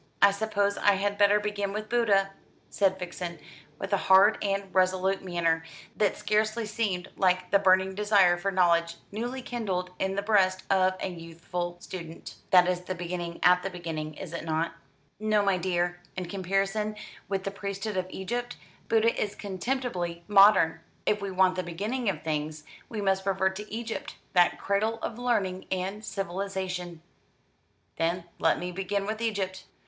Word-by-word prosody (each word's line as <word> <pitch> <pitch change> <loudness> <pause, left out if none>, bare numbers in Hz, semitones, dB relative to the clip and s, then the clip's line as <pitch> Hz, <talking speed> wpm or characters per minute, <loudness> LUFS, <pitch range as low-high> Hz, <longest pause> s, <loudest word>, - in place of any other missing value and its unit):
"I 200 - +7
suppose 205 0 0
I 205 - +5
had 205 +1 -1
better 205 0 +5
begin 205 -1 -2
with 215 +1 -4
Buddha," 205 -5 +2 0.4
said 190 -2 +2
Vixen, 175 -1 -5 0.4
with 195 +4 -4
a - - +5
hard 195 +3 +6
and 195 -1 -2
resolute 185 +1 +2
manner 165 -3 0 0.3
that 210 -2 +1
scarcely 215 +2 0
seemed 205 -4 -2
like 185 -1 +2
the 200 - +5
burning 190 -1 +4
desire 200 -3 +4
for 175 +3 -2
knowledge 170 -3 +2 0.2
newly 245 +5 -4
kindled 190 -8 -3
in 190 0 0
the 200 - -1
breast 190 -3 +3
of 185 -1 +3
a - - -1
youthful 175 +1 -5
student. 170 -3 -8
"That 180 -1 +6
is 180 -1 +1
beginning 175 -1 -5
at 180 +1 +6
the 195 - -3
beginning, 160 -4 -5
is 170 0 -8
it 170 - -4
not?" 160 0 -1 0.5
"No, 215 -1 +2
my 195 -2 +2
dear. 175 0 -1 0.2
In 185 - -2
comparison 195 +3 -1 0.3
with 195 -1 -1
the 195 - -3
priesthood 200 +1 -4
of 185 -1 -1
Egypt, 240 +7 -4 0.3
Buddha 230 +1 +4
is 205 - -2
contemptibly 190 -4 -3
modern. 200 -5 +6 0.3
If 210 0 +1
we 200 - -3
want 185 0 +3
the 185 - -2
beginning 205 +8 -2
of 165 -6 -3
things, 155 0 -3 0.3
we 215 -3 -4
must 190 -1 +1
revert 190 -1 +1
to 210 +1 -8
Egypt, 225 +1 -5 0.2
that 175 -2 +4
cradle 215 +3 0
of 235 - -4
learning 200 -7 0
and 190 +3 -2
civilisation." 185 -3 -4 0.9
"Then 170 +2 0 0.2
let - - +3
me 180 0 -4
begin 195 +2 -2
with 215 +2 -3
Egypt!" 195 -4 -2
190 Hz, 165 wpm, -28 LUFS, 180-205 Hz, 0.9 s, I